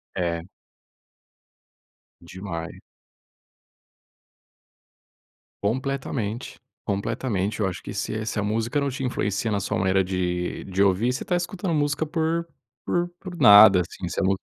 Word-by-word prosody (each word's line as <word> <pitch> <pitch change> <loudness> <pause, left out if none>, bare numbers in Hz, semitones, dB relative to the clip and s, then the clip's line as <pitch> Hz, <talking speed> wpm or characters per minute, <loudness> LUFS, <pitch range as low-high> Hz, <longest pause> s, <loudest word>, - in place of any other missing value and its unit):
É. 85 -1 -2 1.7
Demais. 85 -1 -7 2.9
Completamente, 125 -1 -2 0.3
completamente 105 0 -2
eu 95 - +2
acho 90 -3 -5
que - - -7
se 110 0 -3
se 105 - -2
a - - 0
música 115 +7 0
não 140 0 0
te 135 +1 -5
influencia 105 -3 -1
na 100 - +1
sua 100 - -2
maneira 95 0 +2
de 90 -1 -2
de 95 +1 +1
ouvir, 100 +6 +2
você 130 - -4
tá 180 - 0
escutando 175 0 -2
música 150 +1 +1
por 165 +1 -1 0.4
por 175 0 0
por 180 -2 -8
nada 105 - +9
assim, - - -6
você - - -2
não 95 - +2
105 Hz, 130 wpm, -25 LUFS, 95-140 Hz, 2.9 s, nada